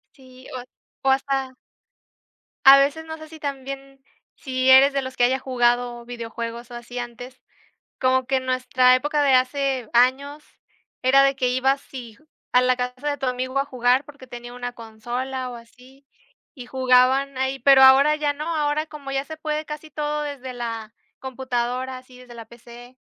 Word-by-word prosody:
Sí, 255 -2 -16
o 255 - -4
ha 245 - -10 0.4
o - - +6
hasta. 270 -1 -1 1.1
A 270 +1 +10
veces 295 +4 0
no 320 0 -7
sé 315 - -11
si 320 - -12
también, 275 -1 -7 0.3
si 260 -2 -1
eres 270 +2 +7
de 275 - 0
los 260 0 -7
que 245 - +1
haya 260 +2 +2
jugado 245 -2 0
videojuegos 235 0 -7
o - - -8
así 240 +1 -7
antes, 245 +1 -9 0.6
como 260 0 +2
que 265 +1 +1
nuestra 255 0 +3
época 295 +3 0
de 280 -2 +3
hace 260 -2 0
años, 275 +5 +2 0.6
era 275 +2 +5
de 275 0 +2
que, 255 -2 0
ibas 265 +2 +1
si 235 -5 -10 0.4
a 250 - +6
la 255 0 +2
casa 250 +3 -4
de 285 - -2
tu 270 - -3
amigo 255 +1 -2
a 275 - 0
jugar 255 0 +1
porque 285 -3 -15
tenía 240 0 -9
1 245 0 -6
consola 245 +3 -5
o 240 - -8
así, 255 +4 -17 0.5
y 250 -3 -10
jugaban 260 +1 +2
ahí, 265 +1 -1
pero 270 +1 +6
ahora 275 +3 +7
ya 295 -1 -1
no, 305 +3 -4
ahora 300 +1 0
como 285 -3 -9
ya 270 0 -1
se 315 +2 -9
puede 305 0 -3
casi 300 +1 -8
todo 300 0 -3
desde 265 -3 -6
la 230 -2 -6 0.3
computadora, 255 0 -3
así 255 0 -15
desde 250 -1 -13
la 230 - -9
PC, 240 +2 -15
260 Hz, 180 wpm, -23 LUFS, 245-275 Hz, 1.1 s, A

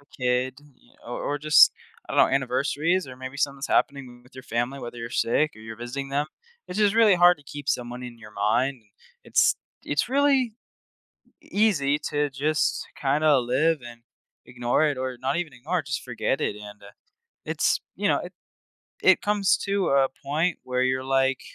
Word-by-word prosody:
a 145 - -26 0.2
kid, 125 +1 0 0.5
or 120 - -5
or 145 - -2
just, 155 +1 +6 0.4
I - - -4
don't - - +5
know, - - +1
anniversaries 140 +7 0
or 130 - -10
maybe 130 +1 -8
something's 140 -1 -1
happening 130 -3 -1
with 125 +1 -22
your 130 - -9
family, 120 +3 -2
whether 120 -1 -8
you're 115 0 -6
sick 150 +6 +1
or - - -13
you're 110 0 -9
visiting 125 +4 -5
them. 145 +2 -1 0.4
It's 180 - -5
just 210 -1 +3
really 225 -4 +6
hard 175 0 +6
to 145 - -20
keep 145 +1 -9
someone 125 -1 -2
in 120 -1 -9
your 105 -1 -13
mind. 115 +5 0 0.4
It's - - +3 0.3
it's - - 0
really 270 -4 +2 0.9
easy 155 -10 +1
to 145 -1 0
just 150 +3 0
kinda 145 +1 +3
live 140 +7 +1
and 120 0 -11 0.5
ignore 125 +4 0
it 145 -3 0
or 130 -1 -3
not 135 +4 -1
even 170 -5 -3
ignore 155 +9 -2
it, 145 - -15
just 135 - -3
forget 125 +2 -2
it 105 - -1
and, 105 0 -11
uh, 100 - -12 0.6
it's, - - +1 0.2
you - - 0
know, - - +3
it - - -8 0.7
it - - +5
comes 205 -2 +2
to 200 -1 -1
a 135 -1 +4 0.2
point 155 +6 0
where 125 0 -1
you're 130 0 0
like, 135 0 +1
135 Hz, 185 wpm, -25 LUFS, 125-155 Hz, 0.9 s, just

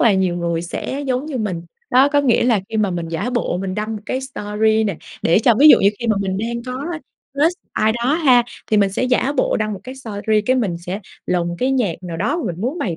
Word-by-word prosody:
là 225 - +5
nhiều 185 -2 +1
người 170 -1 -1
sẽ 265 +10 -4
giống 260 +2 -1
như 290 -5 -4
mình. 185 -7 -3 0.3
Đó, 260 +3 +5
có 290 0 +3
nghĩa 255 -5 +2
là 230 -5 +3
khi 225 - -4
mà 210 -3 +1
mình 170 -2 -3
giả 180 +9 -2
bộ 240 -7 -1
mình 190 -1 -3
đăng 215 +1 -3
một 210 - -10
cái 260 - -2
story 220 -3 0
nè, 200 - -2 0.3
để 170 - +4
cho 230 +1 +4
ví 300 - +8
dụ - - +9
như 195 - +5
khi 235 - -4
mà 215 -2 +2
mình 190 -1 -2
đang 235 +2 -3
có 255 +2 -4 0.5
crush 320 +5 +2
ai 215 +1 +2
đó 240 +5 0
ha, 265 -7 +5 0.2
thì 215 - +1
mình 200 -2 +3
sẽ - - -1
giả 255 +2 +1
bộ - - +2
đăng 215 -1 -1
một 195 - -6
cái 255 +2 -7
story, 220 -4 -1
cái 255 - +3
mình 205 -9 0
sẽ 180 +4 -5 0.3
lồng 175 -1 -1
cái 255 - +1
nhạc 240 -10 +1
nào 175 -2 -5
đó 215 - 0
mà 335 - -3
mình 170 - -10
muốn 260 +10 -2
bày 175 - -2
220 Hz, 265 wpm, -19 LUFS, 190-255 Hz, 0.5 s, dụ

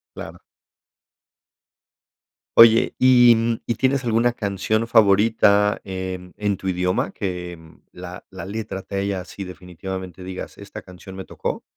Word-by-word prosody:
Claro. - - -8 2.2
Oye, 115 0 +7
¿y 120 -3 +5
y 120 - 0
tienes 135 +1 +1
alguna 115 +1 +2
canción 110 0 -1
favorita 105 -1 +4
en 95 -1 -6
en 105 -1 0
tu 95 - -7
idioma? 90 0 0
Que, 90 -3 -5
mm, 80 0 -17
que - - -16
la 90 +1 -9
la 95 0 -8
letra 100 -1 -5
te 100 - -6
haya 100 -2 -2
sí, 100 - -8
definitivamente, 90 0 -8
digas, 95 0 -8
esta - - -10
canción 90 +1 -12
me 95 -1 -7
tocó. - - -5
95 Hz, 140 wpm, -22 LUFS, 90-110 Hz, 2.2 s, Oye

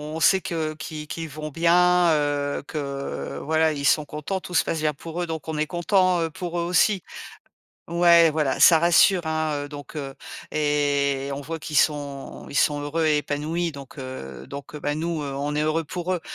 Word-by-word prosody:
on - - -3
sait 190 - +5
que 160 -2 -3
qui 155 -1 -7
qu'ils 165 0 -5
vont 155 +2 -6
bien, 175 +2 +4
heu, 145 -1 -1
que 140 -2 -5
voilà, 160 +1 +2
ils 140 -1 -4
sont 150 +2 +3
contents, 155 +7 -4
tout 180 - -10
se - - +4
passe 165 - -2
bien 155 -1 0
pour 165 +4 -6
eux 175 - -2
donc 160 -2 -5
on 155 - -3
est 155 0 0
contents, 180 0 +2
heu, 165 - -1
pour 175 +1 -5
eux, - - 0
aussi. 180 +3 +2 0.9
Ouais, 170 -1 +6
voilà, 150 -4 0
ça 165 -2 +8
rassure 175 +1 +4
hein, 155 -2 -1
donc 145 +1 -10
heu 135 -2 -5 0.4
et 145 -2 +1
on 140 - -5
voit 160 +3 -5
qu'ils 150 0 -5
sont 145 -2 -1
ils 140 - -10
sont 145 0 +2
heureux 155 +3 -1
et 150 - +3
épanouis, 155 +4 -2
donc 140 0 -11
heu, 130 - -8
donc 140 +1 -8
bah, 145 0 -2
nous, 160 +1 -2
on 140 +1 -3
est 150 - +1
heureux 155 +2 +1
pour 175 +3 -4
eux. 175 - -3
155 Hz, 200 wpm, -24 LUFS, 145-170 Hz, 0.9 s, ça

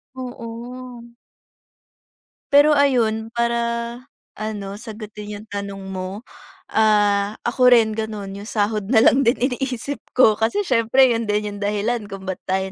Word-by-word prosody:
Oo. 245 0 -8 1.5
Pero 290 +2 +7
ayun, 240 -7 +2
para 235 0 +1 0.8
ano, 215 -2 -4
sagutin 215 -2 -8
yung 210 +2 -11
tanong 200 -1 -5
mo, 190 +3 -5 0.5
ah, 205 -1 +3
ako 250 +1 +3
rin 225 -2 +3
ganun. 215 -2 -4
Yung 205 - -9
sahod 210 -2 -1
na 225 -1 +4
lang 260 - +5
din 235 - +5 0.2
iniisip 265 +2 -3 0.2
ko 220 -4 +5
kasi 230 - +1
siyempre, 255 - +4
yun 230 -1 -1
din 210 0 -1
yung - - -9
dahilan 210 +2 -1
kung 195 -1 -8
ba't 190 -1 -4
tayo 190 0 -1
220 Hz, 135 wpm, -21 LUFS, 205-240 Hz, 1.5 s, Pero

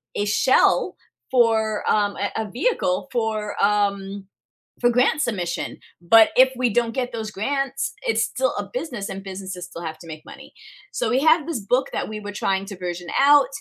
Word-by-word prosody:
a 205 - 0
shell 210 +5 +3 0.4
for, 225 -4 +2
um, 205 -1 +1
a 200 - -2
a 215 - -8
vehicle 245 - 0
for, 215 -3 -2
um, 200 -1 0 0.6
for 240 - +4
grant 255 +5 +2
submission. 180 - -3 0.2
But 220 +6 +6
if 260 +1 +7
we 250 -1 +1
don't 230 +1 0
get 250 0 -2
those 220 -2 -5
grants, 275 +6 -2
it's 480 -2 +1
still - - -1
a - - -4
business 250 - -5
and 195 0 -6
businesses 190 -2 -7
still 170 - -10
have 160 -2 -6
to 165 - -13
make 155 -1 -9
money." - - -13 0.4
So, - - -1
we 255 - +2
have 315 +1 +4
this 325 -8 -2
book 245 +6 0
that - - -2
we 215 0 -5
were 205 0 -6
trying 195 -1 -1
to 195 - -8
version 175 -1 -5
out. 285 0 +6
215 Hz, 185 wpm, -22 LUFS, 195-260 Hz, 0.6 s, if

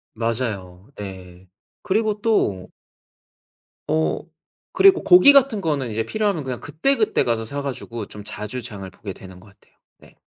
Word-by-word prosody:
맞아요. 110 -5 -3
예. 95 -2 -9 0.3
그리고 215 +1 0
또 100 - 0 1.2
어 80 0 +1 0.5
그리고 390 -1 +5
고기 180 +10 +8
같은 270 -6 +4
거는 145 -7 -1
이제 110 +1 -2
필요하면 200 - -1
그냥 130 -2 -4
그때그때 225 - +1
가서 115 -2 -1
사 140 +5 -4
가지고 120 -5 -6
좀 105 - -10
자주 105 +5 -5
장을 100 -5 -7
보게 95 +1 -8
되는 95 -1 -13
것 95 - -18
같아요. 100 - -24 0.2
네. - - -19
115 Hz, 290 characters per minute, -22 LUFS, -, 1.2 s, 고기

